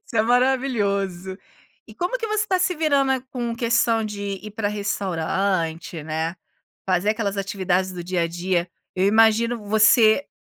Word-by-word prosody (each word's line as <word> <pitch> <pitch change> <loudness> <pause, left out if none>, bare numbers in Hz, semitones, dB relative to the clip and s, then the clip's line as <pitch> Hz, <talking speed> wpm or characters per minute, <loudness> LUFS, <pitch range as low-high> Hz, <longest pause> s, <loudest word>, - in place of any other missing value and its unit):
Isso 230 - -6
é 215 - +4
maravilhoso. 205 -7 0 0.5
E - - -14
como 360 +8 -2
que 455 - -3
você 430 0 0
tá 370 - +1
se 365 0 +1
virando 280 -4 +2
com 240 -2 -3
questão 230 -1 +1
de 200 -2 -5
ir 215 - -8
pra 210 -2 -2
restaurante, 185 -4 -2
né? 160 +3 -3 0.5
Fazer 185 +3 +2
aquelas 205 -3 -2
atividades 190 -1 -1
do 175 -1 -7
dia 180 -1 -1
a - - +1
dia. 175 0 -1 0.3
Eu 185 +1 +1
imagino, 225 +2 +3
você 220 +3 +5
205 Hz, 155 wpm, -23 LUFS, 185-235 Hz, 0.5 s, você